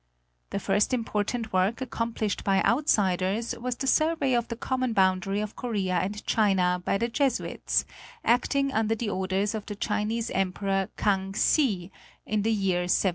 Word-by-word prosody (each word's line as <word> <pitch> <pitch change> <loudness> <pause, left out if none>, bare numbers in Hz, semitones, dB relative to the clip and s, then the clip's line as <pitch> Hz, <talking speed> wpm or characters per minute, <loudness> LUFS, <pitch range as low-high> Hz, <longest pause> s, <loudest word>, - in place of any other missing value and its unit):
The - - -3
first 205 +6 +1
important 225 -1 -2
work 185 +4 +2
accom 235 -2 -3
plished 215 -2 -2
by 195 -1 +2
outsiders 210 - +1
was 250 +1 -2
the 270 - -4
survey 310 -1 +2
of 240 -1 +1
the 230 - -4
common 255 0 -1
boundary 190 0 +2
of 210 0 -5
Korea 205 -7 -2
and 195 +4 -2
China 185 -4 +2
by 195 - +1
the 235 - 0
Jesuits, 260 +1 0 0.4
acting 275 +3 +2
under 220 0 +1
the 220 -1 -3
orders 190 +2 -1
of 215 -2 -5
the 205 - -5
Chinese 215 +2 -1
Emperor 195 0 0
Kang 195 -1 0
hsi, 200 - +2 0.3
in 215 -1 0
the 225 +2 +1
year 190 -4 +1
1709. - - -6
210 Hz, 165 wpm, -27 LUFS, 195-235 Hz, 0.4 s, work